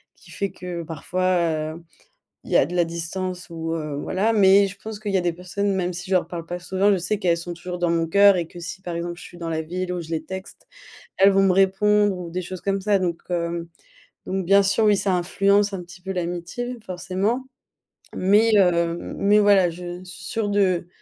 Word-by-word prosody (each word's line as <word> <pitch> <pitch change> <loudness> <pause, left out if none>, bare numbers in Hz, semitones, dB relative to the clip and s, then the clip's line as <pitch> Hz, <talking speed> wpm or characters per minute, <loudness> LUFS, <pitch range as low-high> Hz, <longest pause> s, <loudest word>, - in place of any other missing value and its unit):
qui - - -20
fait 200 -2 -3
que, 180 -2 -6
parfois, 165 -1 -1
heu, 165 - -12 0.6
il - - -11
y - - +5
a - - +4
de 180 - -6
la 175 -1 +3
distance 180 +2 -4
ou 165 0 -4
heu, 150 -3 -4
voilà, 210 +5 0
mais 200 -1 +6
je 195 +1 -10
pense 215 -1 -6
qu'il 205 -2 -4
y - - +4
a 185 - +1
des 175 -1 +1
personnes 195 +3 -2
même 180 -1 -1
si 175 +2 -7
je - - +4
leur 180 - +2
parle 170 -1 -6
pas 175 +1 -5
souvent, 190 +3 +1
je 195 - +3
sais 190 +4 -1
qu'elles 170 -4 +2
sont 175 +1 -6
toujours 180 +1 -6
dans 175 -1 +1
mon 165 0 +1
cœur 200 +2 +6
et 170 -2 -2
que 175 - -11
si 180 +2 -7
par 175 -2 -5
exemple 170 0 -4
je 175 - -11
suis 175 - -12
dans 165 -1 -5
la 160 0 -1
ville 180 +3 -4
où 175 - -3
je 160 - -10
les 160 -1 -2
texte, 190 0 -9 0.5
elles 195 +1 +6
vont 195 - +4
me 195 -1 +4
répondre 195 +1 +3
ou 175 -2 -7
des 180 +2 -3
choses 180 0 -7
comme 195 0 -1
ça, 200 0 +2
donc 170 -2 -2
hem, 170 -1 -2 0.6
donc 190 0 -2
bien 200 +2 +5
sûr, 200 +3 +2
oui, 210 -1 +5
ça 195 -2 +1
influence 200 +3 +2
un 185 -2 -4
petit 175 +1 -14
peu 190 +1 -4
l'amitié 180 +8 -4
forcément, 190 +8 -2 0.7
mais 210 +4 +4
heu, 170 -3 +3 0.2
mais 205 +1 +4
voilà, 200 -4 +5
je 175 +1 -7
suis 180 -1 -10
sûre 215 +2 -2
de 185 -4 +1
180 Hz, 230 wpm, -23 LUFS, 170-195 Hz, 0.7 s, mais